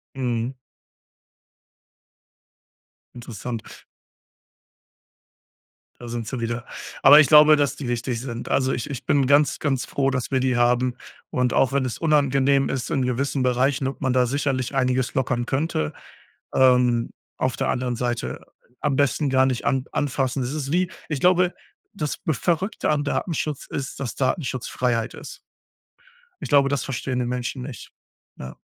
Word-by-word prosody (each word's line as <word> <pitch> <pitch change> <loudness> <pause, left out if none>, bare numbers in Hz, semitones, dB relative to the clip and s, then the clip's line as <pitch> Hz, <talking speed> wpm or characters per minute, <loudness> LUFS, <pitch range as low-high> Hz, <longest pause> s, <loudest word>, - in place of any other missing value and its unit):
Mhm. 120 -1 -2 2.6
Interessant. 120 -1 -6 2.4
Da 120 - -8
sind 115 -1 -5
sie 130 - -4
wieder. 120 +1 -3 0.4
Aber 145 +3 +10
ich 155 - +6
glaube, 150 +1 +8
dass 145 -2 0
die 135 - -6
wichtig 120 0 -2
sind. 120 -2 -6
Also, 130 0 +1
ich 125 - -4
ich 135 -4 -6
bin 140 -2 +2
ganz, 145 +2 +3
ganz 135 -4 -1
froh, 135 -1 0
dass 130 -1 -3
wir 130 - +2
die 130 -1 +1
haben. 120 +1 +2 0.3
Und 125 -1 0
auch 135 - +3
wenn 135 -1 +1
es 125 - -4
unangenehm 140 -3 +2
ist, 130 -2 -3
in 130 -3 0
gewissen 130 +2 -1
Bereichen, 130 +2 +1
und 135 - -6
man 130 -2 +1
da 125 -1 +3
sicherlich 135 0 -1
einiges 130 -1 +1
lockern 130 -2 0
könnte, 135 - -1 0.6
ähm, 125 -2 +3 0.3
auf 130 - -1
der - - -1
anderen 125 -1 -1
Seite 120 0 -3 0.4
am 145 -2 0
besten 140 +1 +1
gar 130 0 +3
nicht 130 -2 -2
an 135 -2 +1
anfassen. 135 -2 -1
Das 125 +2 -3
ist 145 -2 -3
wie 180 +1 +1 0.2
ich 150 -4 -3
glaube, 180 +1 +4 0.4
das 150 -8 -3
Verrückte 170 - 0
an 150 -1 +1
Datenschutz 150 -1 -2
ist, 135 0 -5
dass 125 -5 -4
Datenschutz 130 -2 -2
Freiheit 120 -3 -1
ist. - - -10 1.0
Ich - - -5
glaube, 140 -2 +4
das 140 -3 -1
verstehen 130 -1 -3
die 125 - 0
Menschen 125 +1 -3
nicht. 125 -5 -9 0.5
Ja. 65 -1 -9
130 Hz, 155 wpm, -23 LUFS, 125-140 Hz, 2.6 s, Aber